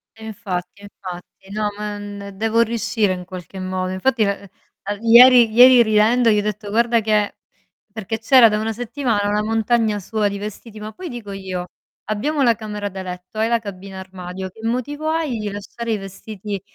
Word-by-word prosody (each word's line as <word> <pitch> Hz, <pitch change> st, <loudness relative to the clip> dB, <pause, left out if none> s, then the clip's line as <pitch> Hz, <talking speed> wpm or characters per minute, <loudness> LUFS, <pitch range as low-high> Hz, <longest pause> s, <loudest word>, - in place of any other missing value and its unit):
E 220 Hz, 0 st, -11 dB
infatti, 195 Hz, -3 st, -5 dB
e 205 Hz, -, -11 dB
infatti. 185 Hz, +1 st, -10 dB
No, 210 Hz, 0 st, -1 dB
ma, 210 Hz, 0 st, -4 dB
n 205 Hz, -1 st, -8 dB
devo 225 Hz, +2 st, +2 dB
riuscire 225 Hz, -3 st, 0 dB
in 180 Hz, -, -6 dB
qualche 185 Hz, 0 st, -9 dB
modo. 185 Hz, 0 st, -3 dB
Infatti, 225 Hz, +4 st, +1 dB
l -, -, 0 dB
ehm, 200 Hz, +1 st, -7 dB
ieri 235 Hz, 0 st, +8 dB
ieri 250 Hz, +1 st, +8 dB
ridendo 225 Hz, +2 st, +3 dB
gli 210 Hz, -, +4 dB
ho -, -, +1 dB
detto: 210 Hz, 0 st, -4 dB
"Guarda 235 Hz, +2 st, +3 dB
che" 210 Hz, -1 st, +1 dB, 0.6 s
Perché 220 Hz, +1 st, -4 dB
c'era 240 Hz, +1 st, +7 dB
da 210 Hz, -, 0 dB
una 220 Hz, +1 st, -1 dB
settimana 230 Hz, -2 st, -1 dB
una 210 Hz, +1 st, +1 dB
montagna 225 Hz, -1 st, +1 dB
sua 210 Hz, +2 st, -1 dB
di 200 Hz, -, -5 dB
vestiti, 215 Hz, +2 st, -8 dB
ma 215 Hz, -, -6 dB
poi 365 Hz, +9 st, -8 dB
dico 230 Hz, -5 st, -7 dB
io: 185 Hz, -2 st, -5 dB, 0.4 s
"Abbiamo 280 Hz, +8 st, -1 dB
la 235 Hz, -2 st, +4 dB
camera 210 Hz, -2 st, -5 dB
da 190 Hz, 0 st, -7 dB
letto, 180 Hz, +2 st, -8 dB
hai 220 Hz, -, +2 dB
la 235 Hz, -1 st, +2 dB
cabina 195 Hz, -2 st, -8 dB
armadio, 185 Hz, 0 st, -7 dB
che 220 Hz, -, -16 dB
motivo 290 Hz, +6 st, -2 dB
hai 315 Hz, -6 st, -1 dB
di 210 Hz, -1 st, -3 dB
lasciare 225 Hz, +3 st, -5 dB
i -, -, 0 dB
vestiti 195 Hz, 0 st, -7 dB
210 Hz, 190 wpm, -20 LUFS, 195-230 Hz, 0.6 s, ieri